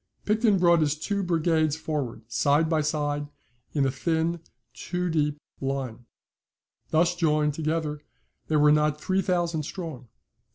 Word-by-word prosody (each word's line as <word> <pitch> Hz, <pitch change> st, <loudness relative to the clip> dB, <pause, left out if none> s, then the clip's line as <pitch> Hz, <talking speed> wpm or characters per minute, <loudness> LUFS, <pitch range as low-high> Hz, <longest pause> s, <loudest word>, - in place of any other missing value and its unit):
Picton 215 Hz, -1 st, +3 dB
brought 170 Hz, -2 st, +5 dB
his 150 Hz, -1 st, +2 dB
two 200 Hz, +5 st, -2 dB
brigades 160 Hz, -3 st, +1 dB
forward, 145 Hz, -8 st, -4 dB
side 145 Hz, +6 st, +2 dB
by 160 Hz, -1 st, +1 dB
side, 145 Hz, -1 st, -1 dB, 0.5 s
in 140 Hz, -2 st, +3 dB
a 135 Hz, -, +1 dB
thin, 165 Hz, +4 st, 0 dB, 0.3 s
two 180 Hz, +3 st, -3 dB
deep 150 Hz, -2 st, +1 dB, 0.2 s
line. 135 Hz, -4 st, -3 dB, 0.8 s
Thus 170 Hz, +2 st, +3 dB
joined 150 Hz, -3 st, +2 dB
together, 155 Hz, -1 st, -2 dB, 0.5 s
they 155 Hz, -, 0 dB
were 150 Hz, 0 st, +6 dB
not 150 Hz, 0 st, +2 dB
three 190 Hz, +4 st, +1 dB
thousand 175 Hz, -4 st, 0 dB
strong. 155 Hz, -5 st, -7 dB
155 Hz, 135 wpm, -26 LUFS, 145-170 Hz, 0.8 s, were